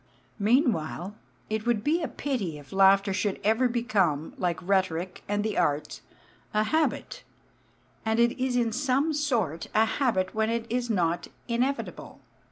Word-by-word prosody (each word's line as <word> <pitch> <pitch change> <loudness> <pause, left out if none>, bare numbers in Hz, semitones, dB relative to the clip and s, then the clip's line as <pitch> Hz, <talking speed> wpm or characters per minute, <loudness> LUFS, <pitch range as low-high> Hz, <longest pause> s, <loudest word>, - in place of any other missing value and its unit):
Meanwhile, 205 - +1 0.3
it 220 +1 -3
would 225 -3 +1
be 325 +4 +2
a 315 - -1
pity 210 - -3
if 145 -2 -13
laughter 195 +1 +5
should 205 0 -1
ever 225 +5 +3
become, 200 - 0
like 175 -2 -1
rhetoric 185 -2 0
and 205 0 0
the 215 -1 -1
arts, 150 -3 -1 0.5
a 215 - +4
habit. 315 +8 -1 0.8
And 220 +1 0
it 235 0 +3
is 260 -1 0
in 235 -2 +2
some 275 +5 +1
sort 235 - -1
a 220 +1 +5
habit 220 -7 0
when 220 0 +1
it 230 0 -1
is 245 0 -1
not 175 -5 0 0.2
inevitable. 255 +4 -2
220 Hz, 150 wpm, -27 LUFS, 185-245 Hz, 0.8 s, laughter